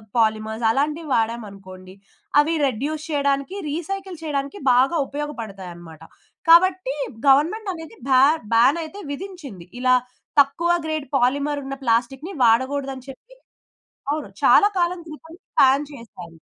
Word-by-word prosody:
Polymers 220 Hz, 0 st, 0 dB
అలాంటివి 300 Hz, +4 st, -1 dB
వాడామనుకోండి. 195 Hz, -5 st, -4 dB, 0.5 s
అవి 315 Hz, +3 st, +2 dB
reduce 290 Hz, +5 st, -3 dB
చేయడానికి, 280 Hz, +3 st, -1 dB
రీసైకిల్ 370 Hz, +3 st, -5 dB
చేయడానికి 285 Hz, +4 st, -3 dB
బాగా 265 Hz, +7 st, +3 dB
ఉపయోగపడతాయన్నమాట. 195 Hz, -, -8 dB, 0.5 s
కాబట్టి, 360 Hz, -3 st, +5 dB, 0.3 s
గవర్నమెంట్ 350 Hz, +10 st, +3 dB
అనేది 325 Hz, -2 st, -10 dB
భా 260 Hz, -1 st, +6 dB, 0.3 s
బాన్ 255 Hz, +8 st, +4 dB
అయితే 355 Hz, +6 st, -9 dB
విధించింది. 285 Hz, -, -8 dB
ఇలా 255 Hz, 0 st, +4 dB, 0.4 s
తక్కువ 325 Hz, +5 st, +3 dB
గ్రేడ్ 310 Hz, -2 st, -3 dB
పాలిమర్ 285 Hz, +4 st, 0 dB
ఉన్న 275 Hz, 0 st, -5 dB
ప్లాస్టిక్‌ని 250 Hz, +8 st, 0 dB
వాడకూడదని 260 Hz, +3 st, +1 dB
చెప్పి. 440 Hz, -, -13 dB, 0.8 s
అవును. 305 Hz, +1 st, -4 dB
చాలా 410 Hz, -, +6 dB
కాలం 350 Hz, 0 st, 0 dB
క్రితం 320 Hz, +1 st, -12 dB, 0.3 s
బాన్ 275 Hz, +2 st, +5 dB
చేశారు. 180 Hz, -10 st, -12 dB
275 Hz, 115 wpm, -22 LUFS, 235-320 Hz, 0.8 s, భా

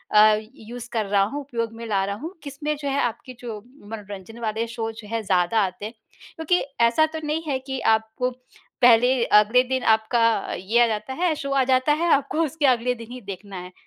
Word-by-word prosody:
अ, 215 Hz, 0 st, +7 dB, 0.2 s
use 235 Hz, 0 st, -9 dB
कर 220 Hz, -2 st, 0 dB
रहा 200 Hz, 0 st, +3 dB
हूँ, 280 Hz, +9 st, -3 dB
उपयोग 230 Hz, -5 st, -4 dB
में 230 Hz, 0 st, -8 dB
ला 195 Hz, -2 st, +1 dB
रहा 200 Hz, -, -3 dB
हूँ, 320 Hz, -, -7 dB
किसमें 295 Hz, +2 st, -3 dB
जो 285 Hz, -1 st, -5 dB
है 275 Hz, +1 st, 0 dB
आपके 240 Hz, +2 st, -3 dB
जो 225 Hz, -4 st, -6 dB, 0.3 s
मनोरंजन 205 Hz, 0 st, -9 dB
वाले 225 Hz, +1 st, -2 dB
शो 225 Hz, -1 st, -4 dB
जो 220 Hz, -1 st, -11 dB
हैं 230 Hz, -1 st, -2 dB
ज़्यादा 185 Hz, +3 st, +2 dB
आते 185 Hz, +2 st, -6 dB
हैं। 225 Hz, -, -6 dB, 0.4 s
क्योंकि 325 Hz, +3 st, +1 dB, 0.2 s
ऐसा 235 Hz, +7 st, +4 dB
तो 320 Hz, -, -3 dB
नहीं 310 Hz, +2 st, -2 dB
है 265 Hz, -2 st, 0 dB
कि 265 Hz, -1 st, -3 dB, 0.2 s
आपको 220 Hz, +3 st, -4 dB, 0.5 s
पहले 245 Hz, +1 st, +5 dB
अगले 215 Hz, +4 st, +5 dB
दिन 260 Hz, 0 st, -2 dB
आपका 230 Hz, +1 st, +2 dB, 0.3 s
ये 215 Hz, +6 st, +1 dB
आ -, -, +3 dB
जाता 215 Hz, +4 st, -3 dB
है 335 Hz, +1 st, 0 dB
शो 280 Hz, -2 st, -5 dB
आ 275 Hz, -1 st, +3 dB
जाता 255 Hz, +2 st, +3 dB
है, 335 Hz, +3 st, 0 dB
आपको 280 Hz, +3 st, +1 dB
उसके 300 Hz, +1 st, -2 dB
अगले 250 Hz, 0 st, +2 dB
दिन 230 Hz, +1 st, -11 dB
ही 250 Hz, 0 st, -8 dB
देखना 200 Hz, -1 st, -8 dB
है। 180 Hz, 0 st, -8 dB
235 Hz, 210 wpm, -23 LUFS, 215-270 Hz, 0.5 s, अ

